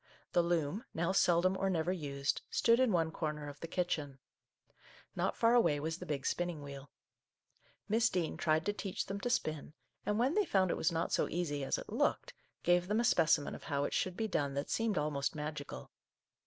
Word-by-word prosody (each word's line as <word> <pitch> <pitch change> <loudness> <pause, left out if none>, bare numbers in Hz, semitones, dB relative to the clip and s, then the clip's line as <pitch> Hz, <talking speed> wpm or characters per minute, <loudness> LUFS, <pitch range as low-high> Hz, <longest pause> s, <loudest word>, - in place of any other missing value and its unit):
The 175 - +4
loom, 170 - 0
now 170 +3 +1
seldom 185 0 +3
or 195 0 0
never 175 -1 0
used, 140 -5 -2
stood 230 +1 +3
in 260 -3 +4
one 165 -3 +1
corner 150 -2 -3
of 145 0 -9
the 165 - -6
kitchen. 160 -6 -2 1.0
Not - - -1
far 230 0 +4
away 225 -12 +4
was 160 +3 -3
the 180 - -8
big 140 -3 -3
spin 175 - 0
ning 160 -4 -6
wheel. 140 0 -9 1.0
Miss 225 +2 +3
Dean 175 -3 -1
tried 155 0 +1
to 205 - +1
teach 195 -2 -3
them 195 +1 -4
to 245 - -2
spin, 155 -8 -2 0.3
and 210 0 0
when 255 +6 +2
they 420 - +3
found 190 - +2
it - - 0
was 165 - +1
not 165 0 -1
so - - +2
easy 150 -5 -2
as 135 - 0
it - - -8
looked, - - 0 0.3
gave 175 0 +3
them 210 +3 +1
a - - +2
specimen 160 -6 +3
of - - -9
how 140 -2 0
it - - -2
should 185 -1 -1
be 220 - 0
done 140 -8 -1
that 140 +1 -3
seemed 225 -3 0
almost 150 -1 -1
magical. 150 - -6
170 Hz, 210 wpm, -34 LUFS, 150-190 Hz, 1.0 s, The